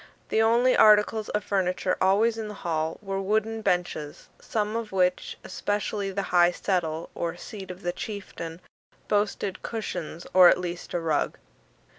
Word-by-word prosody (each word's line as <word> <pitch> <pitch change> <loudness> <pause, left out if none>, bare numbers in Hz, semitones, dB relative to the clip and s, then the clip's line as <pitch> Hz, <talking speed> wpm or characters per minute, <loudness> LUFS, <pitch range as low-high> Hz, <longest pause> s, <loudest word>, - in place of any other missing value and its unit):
The 220 - +2
only 235 +3 +4
articles 215 0 +5
of 210 - -1
furniture 185 -1 0
always 210 +5 +3
in 220 -1 -5
the 210 - -7
hall 160 -1 -1
were 195 -1 -2
wooden 220 +3 0
benches; 175 -6 -2
some 215 0 -2
of 230 -2 -3
which, 180 -1 0
especially 205 +1 -2
the 195 +1 -2
high 175 -1 +6
settle 170 -3 -2
or 170 0 -3
seat 195 -1 -9
of 180 +2 -9
the 175 0 -1
chieftain, 180 -5 -7 0.5
boasted 205 -2 -1
cushions, 175 -7 -5
or 185 -1 +9
at - - +4
least 175 -1 -5
a - - +1
rug. 160 -3 0
195 Hz, 155 wpm, -26 LUFS, 175-210 Hz, 0.5 s, or